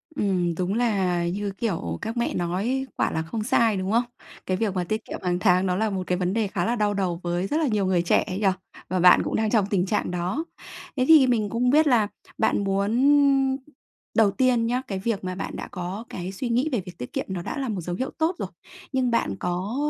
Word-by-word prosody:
Ừm, 180 Hz, -7 st, 0 dB
đúng 185 Hz, +3 st, -1 dB
là 190 Hz, -7 st, +1 dB
như 200 Hz, +3 st, -2 dB
kiểu 85 Hz, -, -2 dB
các 225 Hz, +2 st, -4 dB
mẹ 235 Hz, -, 0 dB
nói 200 Hz, +10 st, -1 dB
quả -, -, +1 dB
là 160 Hz, -, -1 dB
không 210 Hz, +7 st, -4 dB
sai, 225 Hz, -2 st, +2 dB
đúng 190 Hz, +1 st, -2 dB
không? 235 Hz, +2 st, +3 dB, 0.4 s
Cái 185 Hz, -, 0 dB
việc 210 Hz, -2 st, 0 dB
mà 180 Hz, -, 0 dB
tiết 215 Hz, +5 st, -3 dB
kiệm -, -, -6 dB
hàng 180 Hz, -1 st, 0 dB
tháng 185 Hz, -1 st, +3 dB
nó 180 Hz, -1 st, +1 dB
là 220 Hz, +3 st, +1 dB
một 190 Hz, -2 st, -2 dB
cái 180 Hz, -, +1 dB
vấn 180 Hz, 0 st, -1 dB
đề 220 Hz, -1 st, +1 dB
khá 180 Hz, -2 st, -2 dB
là 235 Hz, -, +1 dB
đau 210 Hz, -2 st, +1 dB
đầu 185 Hz, -4 st, -1 dB
với 175 Hz, +2 st, -1 dB
rất 300 Hz, -, 0 dB
là 320 Hz, -2 st, +1 dB
nhiều 210 Hz, -5 st, +1 dB
người 185 Hz, -2 st, +2 dB
trẻ 170 Hz, -, +3 dB
ấy 185 Hz, -, -3 dB
nhỉ, 205 Hz, -, +2 dB, 0.4 s
và 185 Hz, -, 0 dB
bạn 180 Hz, +1 st, +7 dB
cũng -, -, -2 dB
đang 220 Hz, 0 st, +1 dB
trong 215 Hz, -3 st, +3 dB
tình 185 Hz, -3 st, +1 dB
trạng 200 Hz, -2 st, -1 dB
đó. 180 Hz, -, -2 dB, 0.5 s
Thế 255 Hz, -, +2 dB
thì 310 Hz, -5 st, +7 dB
mình 220 Hz, -4 st, +1 dB
cũng 240 Hz, +3 st, +1 dB
biết 305 Hz, +4 st, +5 dB
là 235 Hz, -6 st, +4 dB, 0.3 s
bạn -, -, +1 dB
muốn 200 Hz, +2 st, 0 dB, 1.2 s
đầu 215 Hz, -3 st, +5 dB
tiên 245 Hz, +1 st, +2 dB
nhá, 245 Hz, +2 st, 0 dB
cái 195 Hz, -2 st, -3 dB
việc 205 Hz, 0 st, -2 dB
mà 185 Hz, 0 st, -3 dB
bạn 195 Hz, -, -5 dB
đã -, -, -6 dB
có 185 Hz, +4 st, -5 dB
cái 180 Hz, +1 st, -5 dB
suy 240 Hz, +6 st, -4 dB
nghĩ 250 Hz, +6 st, +1 dB
về 240 Hz, -7 st, 0 dB
việc 180 Hz, -2 st, -10 dB
tiết 125 Hz, -, -7 dB
kiệm -, -, -2 dB
nó 185 Hz, -2 st, -3 dB
đã -, -, -5 dB
là 270 Hz, -3 st, -2 dB
một 195 Hz, -5 st, -2 dB
dấu 175 Hz, +1 st, -4 dB
hiệu 260 Hz, +7 st, -3 dB
tốt 325 Hz, +3 st, +1 dB
rồi, -, -, -3 dB, 0.4 s
nhưng 260 Hz, -2 st, +1 dB
bạn 165 Hz, -, 0 dB
có 180 Hz, +5 st, -2 dB
200 Hz, 245 wpm, -25 LUFS, 180-235 Hz, 1.2 s, bạn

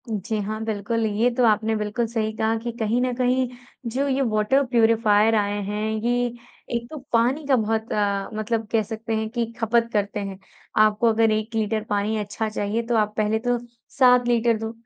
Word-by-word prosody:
जी 215 Hz, +1 st, -2 dB
हाँ, 215 Hz, +2 st, -4 dB
बिल्कुल 220 Hz, +1 st, -1 dB
ये 220 Hz, +3 st, +2 dB
तो 250 Hz, -, +2 dB
आपने 220 Hz, 0 st, +2 dB
बिल्कुल 215 Hz, +2 st, -1 dB
सही 220 Hz, -1 st, -1 dB
कहा 220 Hz, +1 st, +1 dB
कि 235 Hz, +1 st, -4 dB
कहीं 230 Hz, +1 st, 0 dB
न 255 Hz, 0 st, 0 dB
कहीं 255 Hz, +1 st, +1 dB, 0.4 s
जो 270 Hz, +5 st, -1 dB
ये 275 Hz, 0 st, +1 dB
वाटर 215 Hz, +6 st, +2 dB
प्यूरीफायर 225 Hz, -2 st, +3 dB
आए 205 Hz, -1 st, 0 dB
हैं, 210 Hz, +2 st, -3 dB, 0.2 s
ये 245 Hz, +1 st, +1 dB, 0.5 s
एक 235 Hz, 0 st, -3 dB
तो 310 Hz, -, -7 dB, 0.2 s
पानी 250 Hz, +6 st, +2 dB
का 275 Hz, -, +4 dB
बहुत 220 Hz, -1 st, -1 dB
अ, 200 Hz, -1 st, 0 dB
मतलब 220 Hz, +1 st, -2 dB
कह 225 Hz, -2 st, +2 dB
सकते 225 Hz, +1 st, -4 dB
हैं 220 Hz, 0 st, -2 dB
कि 235 Hz, 0 st, -1 dB
खपत 230 Hz, +1 st, +2 dB
करते 205 Hz, 0 st, -1 dB
हैं। 195 Hz, -1 st, -6 dB, 0.4 s
आपको 215 Hz, +2 st, +3 dB
अगर 225 Hz, 0 st, +3 dB
1 215 Hz, +1 st, -2 dB
लीटर 215 Hz, 0 st, 0 dB
पानी 205 Hz, +2 st, 0 dB
अच्छा 210 Hz, +1 st, -3 dB
चाहिए 215 Hz, +1 st, -2 dB
तो 240 Hz, -, +1 dB
आप 210 Hz, -1 st, +1 dB
पहले 215 Hz, +1 st, +1 dB
तो 245 Hz, +1 st, 0 dB, 0.4 s
7 250 Hz, -2 st, +5 dB
लीटर 235 Hz, -1 st, +2 dB
दो। 220 Hz, 0 st, -4 dB
220 Hz, 195 wpm, -23 LUFS, 210-235 Hz, 0.5 s, 7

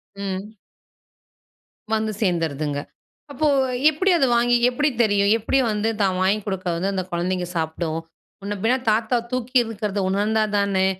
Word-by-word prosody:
ம். 200 Hz, +2 st, -5 dB, 1.4 s
வந்து 220 Hz, 0 st, -1 dB
சேர்ந்துருதுங்க. 155 Hz, -6 st, -1 dB, 0.5 s
அப்போ 305 Hz, +3 st, 0 dB, 0.4 s
எப்புடி 370 Hz, +6 st, +1 dB
அதை 270 Hz, -, +3 dB
வாங்கி 240 Hz, +1 st, +3 dB
எப்புடி 290 Hz, +4 st, +1 dB
தெரியும்? 205 Hz, -2 st, +2 dB
எப்புடி 230 Hz, +5 st, +1 dB
வந்து 210 Hz, +1 st, 0 dB
தான் 190 Hz, -2 st, +1 dB
வாங்கி 195 Hz, +3 st, +2 dB
கொடுக்க 190 Hz, -2 st, -4 dB
வந்து, 190 Hz, +4 st, -1 dB
அந்த 190 Hz, -, -1 dB
குழந்தைங்க 180 Hz, +1 st, -1 dB
சாப்பிடும்? 160 Hz, 0 st, -2 dB, 0.4 s
முன்ன 205 Hz, +1 st, -3 dB
பின்ன 235 Hz, +3 st, +3 dB, 0.2 s
தாத்தா 225 Hz, +3 st, +1 dB
தூக்கி 255 Hz, 0 st, -3 dB
இருக்கிறத 210 Hz, -2 st, -3 dB
உணர்ந்தா 210 Hz, +3 st, +1 dB
தானே, 195 Hz, -2 st, +2 dB
200 Hz, 135 wpm, -22 LUFS, 185-225 Hz, 1.4 s, அதை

